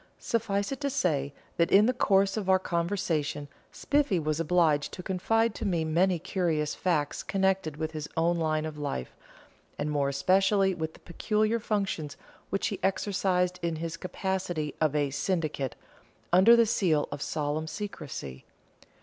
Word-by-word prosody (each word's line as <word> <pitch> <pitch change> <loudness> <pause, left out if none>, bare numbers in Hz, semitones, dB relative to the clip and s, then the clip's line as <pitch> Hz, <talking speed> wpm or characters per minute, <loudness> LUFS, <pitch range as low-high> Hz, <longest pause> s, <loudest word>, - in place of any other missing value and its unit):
Suffice 205 -2 -1
it 275 - -5
to 280 - 0
say, 155 - 0 0.3
that 170 - +3
in 200 +2 +6
the 250 - +2
course 195 -4 +3
of 205 -4 -3
our 190 - +6
conversation 170 -5 -1 0.2
Spiffy 285 -9 +1
was 155 -1 -1
obliged 165 -3 +2
to 180 - -7
confide 225 +5 +1
to - - -7
me 170 -4 0
many 175 +3 +2
curious 170 -4 -1
facts 160 -6 -1
connected 190 -6 0
with 160 0 -3
his 155 -2 -6
own 170 +1 +2
line 155 -1 0
of 155 -1 -6
life, 140 - -4 0.6
and 150 - -2
more 140 -2 +1
especially 190 +6 +3
with 160 -2 -4
the - - -16
peculiar 215 +5 0
functions 195 -9 -2 0.3
which 195 - 0
he 200 - -4
exercised 185 -2 0
in 170 -1 -1
his 165 +1 -4
capacity 180 -4 -3
of 155 -2 +2
a 145 -2 +1
"syndic," 150 -3 -2 0.6
under 190 +6 +8
the 235 0 +5
seal 175 -9 +1
of 145 -1 -5
solemn 155 +1 -2
secrecy. 140 - -6
175 Hz, 160 wpm, -28 LUFS, 155-195 Hz, 0.6 s, under